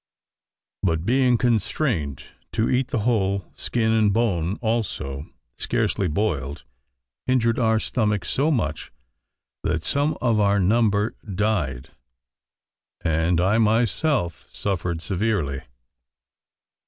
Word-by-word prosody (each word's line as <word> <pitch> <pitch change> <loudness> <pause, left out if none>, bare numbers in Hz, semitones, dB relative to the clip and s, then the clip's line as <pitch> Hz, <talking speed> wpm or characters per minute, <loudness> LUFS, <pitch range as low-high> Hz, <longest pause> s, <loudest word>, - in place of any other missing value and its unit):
But 80 -2 0
being 125 +1 +3
constrained 110 - 0 0.3
to 110 0 +1
eat 130 0 +2
the 125 -7 -1
whole, 100 -5 +1
skin 110 -2 0
and 110 -2 +3
bone 100 -5 +1
also, 105 - -2 0.3
scarcely 95 - 0
boiled, 75 -6 -2 0.6
injured 115 -3 +2
our 110 -2 +3
stomachs 105 -6 0
so 145 +4 +2
much, 95 - -1 0.7
that 80 - -1
some 145 +2 +1
of 115 -3 +2
our 100 0 +3
number 105 +2 +2 0.2
died, 75 - -1 1.1
and 80 +2 +1
I 95 +5 +3
myself 115 - +1
suffered 90 -4 -2
severely. 95 -9 -1
105 Hz, 105 wpm, -24 LUFS, 85-115 Hz, 1.1 s, being